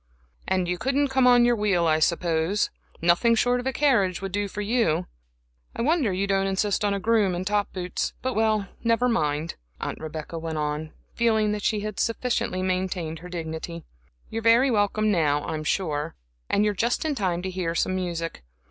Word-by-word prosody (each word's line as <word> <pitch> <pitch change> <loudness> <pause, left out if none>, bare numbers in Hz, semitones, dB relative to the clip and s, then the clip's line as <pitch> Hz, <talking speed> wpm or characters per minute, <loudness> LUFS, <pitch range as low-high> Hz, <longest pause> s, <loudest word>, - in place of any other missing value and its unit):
"And 185 -2 +1
you 180 0 -2
couldn't 275 +4 +1
come 265 -1 +3
on 245 -1 +6
your 240 0 +4
wheel, 200 -5 +1
I 155 -1 +3
suppose? 170 +3 +1 0.3
Nothing 175 +8 +4
short 245 +2 +2
of 250 - -4
a - - +1
carriage 245 -10 +2
would 195 -1 -5
do 205 +1 -1
for 205 +1 -5
you. 200 -6 +1 0.7
I - - -2
wonder 295 - +2
you 190 +2 0
don't 195 -1 +1
insist 195 +2 0
on 205 -1 +1
a - - -2
groom 210 -3 +2
in 180 +1 -3
top 205 0 0
boots. 180 -1 -3
But 260 0 -1
well, 215 -2 +1 0.2
never 230 +1 +2
mind," 155 -7 -1 0.2
Aunt - - -4
Rebecca 155 +1 -6
went 160 -1 -4
on, 150 +1 -2 0.2
feeling 220 -2 +2
that 210 0 -2
she 210 +1 0
had 215 0 -5
sufficiently 230 -5 -1
maintained 185 -3 -2
her 180 - -10
dignity 165 -1 -5 0.5
"you're 225 - -3
very 235 +4 +5
welcome 215 0 +2
now, 150 -5 +2
I'm 155 -1 -3
sure, 155 -2 -1 0.3
and 205 - +2
you're 210 - +2
just 235 - 0
in 310 - +1
time 185 -8 -1
to 190 - -3
hear 175 -2 -2
some 185 - +1
music. 170 -3 -3
195 Hz, 190 wpm, -25 LUFS, 170-225 Hz, 0.7 s, on